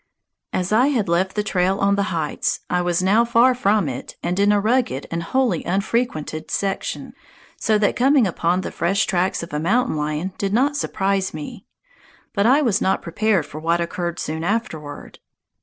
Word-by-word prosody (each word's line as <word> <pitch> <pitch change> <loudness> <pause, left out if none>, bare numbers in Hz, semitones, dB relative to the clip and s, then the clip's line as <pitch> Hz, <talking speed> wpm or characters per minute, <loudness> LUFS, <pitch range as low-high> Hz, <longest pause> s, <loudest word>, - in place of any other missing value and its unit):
As 185 +1 -2
I 240 +5 +4
had 245 -9 0
left 180 +3 0
the 210 - 0
trail 190 -1 +1
on 200 0 +2
the 200 - 0
heights, 160 -4 -2
I 180 - +2
was 175 0 0
now 210 +5 +4
far 235 +2 +4
from 210 -6 +1
it 130 -2 -6
and 175 +2 -1
in 200 +1 +4
a 205 - +3
rugged 220 - 0
and 165 0 -2
wholly 230 -1 0
unfrequented 190 -4 -2
section, 195 -1 -3 0.4
so 215 -1 +1
that 210 -1 +1
coming 265 0 +4
upon 180 0 0
the - - -5
fresh 190 +5 +1
tracks 180 -2 0
of 170 - -9
a 150 - -1
mountain 230 +7 +1
lion 155 +5 -2
did 200 0 -1
not 275 +6 +2
surprise 195 - -1
me. 150 -1 -8 0.7
But 200 0 +2
I 280 +5 +4
was 215 -6 +1
not 190 - +1
prepared 190 -1 +1
for 155 - -9
what 165 +2 +1
occurred 170 0 -3
soon 160 +1 -4
afterward. 165 -8 -4
195 Hz, 185 wpm, -21 LUFS, 170-220 Hz, 0.7 s, I